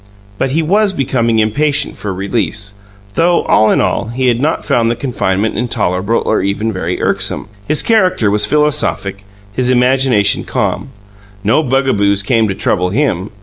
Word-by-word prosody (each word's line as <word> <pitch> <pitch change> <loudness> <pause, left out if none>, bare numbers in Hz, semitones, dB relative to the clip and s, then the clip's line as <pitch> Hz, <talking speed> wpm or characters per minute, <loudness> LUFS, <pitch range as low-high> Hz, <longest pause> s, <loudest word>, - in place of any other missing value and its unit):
But - - 0
he 160 +5 0
was 200 +4 +2
becoming 120 -6 0
impatient 145 +7 +1
for 105 - -4
release, 100 +1 -3 0.4
though, 170 +5 +2
all 110 - +3
in - - +2
all, - - 0
he 125 +2 0
had 120 -1 0
not 155 +5 -1
found 115 -1 +1
the 120 - 0
confinement 110 -5 -2
intolerable 110 -3 0
or 110 - +1
even 105 +3 -2
very - - -3
irksome. - - -1 0.2
His 155 0 +2
character 185 - +2
was 105 0 +3
philosophic, 135 -9 0 0.3
his 125 +3 0
imagination 125 -4 +3
calm; - - -2 0.5
no 110 +9 +2
bugaboos 120 -8 +1
came 115 0 +1
to 95 - -3
trouble 90 0 0
him. 105 -5 -1
115 Hz, 155 wpm, -14 LUFS, 100-135 Hz, 0.5 s, all